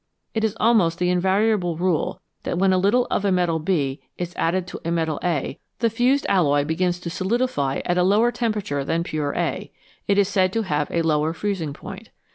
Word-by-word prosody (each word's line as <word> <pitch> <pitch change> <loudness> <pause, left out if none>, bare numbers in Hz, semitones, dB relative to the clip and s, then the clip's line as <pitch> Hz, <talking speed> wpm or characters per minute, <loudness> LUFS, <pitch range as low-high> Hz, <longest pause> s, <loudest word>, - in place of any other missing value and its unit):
It 220 - -1
is 220 0 0
almost 210 -8 +3
the 180 0 +1
invari 190 +5 +2
able 175 -6 -1
rule 175 -2 -1 0.2
that - - -3
when 190 +1 +3
a 185 - +3
little 225 +6 +3
of - - 0
a 200 - +2
metal 175 -3 +1
B 150 -5 -1 0.2
is 175 0 -4
added 175 +2 0
to 180 - -8
a 165 - -3
metal 160 -3 -1
A, 160 -3 -1 0.2
the 230 -2 +1
fused 250 +5 +2
alloy 145 -6 +3
begins 175 +3 0
to 170 - -5
solidify 185 - -1
at 175 0 +1
a - - +4
lower 210 +6 +3
temperature 210 - -2
than 165 +4 -1
pure 150 -3 -3
A; - - -2 0.4
it 200 - +2
is 200 -2 +4
said 190 -2 +2
to 225 - 0
have 150 -6 -1
a 170 - 0
lower 155 0 +1
freezing 170 -3 -2
point. 195 +7 -10
180 Hz, 210 wpm, -23 LUFS, 160-205 Hz, 0.4 s, a